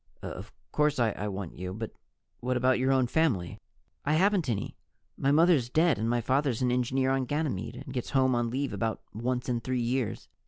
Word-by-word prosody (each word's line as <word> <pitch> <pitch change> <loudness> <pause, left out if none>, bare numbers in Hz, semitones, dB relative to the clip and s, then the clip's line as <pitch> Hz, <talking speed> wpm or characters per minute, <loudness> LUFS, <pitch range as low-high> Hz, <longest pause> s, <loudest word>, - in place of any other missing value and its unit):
"Of - - -7 0.2
course 150 -1 +2
I 110 -4 0
want 95 -3 -5
you. 90 +1 -4
But 110 0 -5 0.5
what 125 +1 0
about 130 0 +3
your 130 +1 +2
own 130 -1 +4
family?" 120 - 0 0.4
"I 150 - +1
haven't 185 -3 +3
any. 105 -4 -2 0.4
My 135 - +1
mother's 155 -5 +4
dead 160 -3 +3
and 110 +1 0
my 120 0 +1
father's 130 -1 +1
an 125 - +2
engineer 130 +2 +1
on 135 -1 +1
Ganymede 145 - -2
and 135 +1 -8
gets 125 -3 -3
home 130 -2 +3
on 120 -1 +1
leave 135 +4 -2
about 115 -1 -2
once 125 +3 -2
in 120 -2 0
three 130 +2 -2
years. 120 0 -1
125 Hz, 195 wpm, -29 LUFS, 115-140 Hz, 0.5 s, own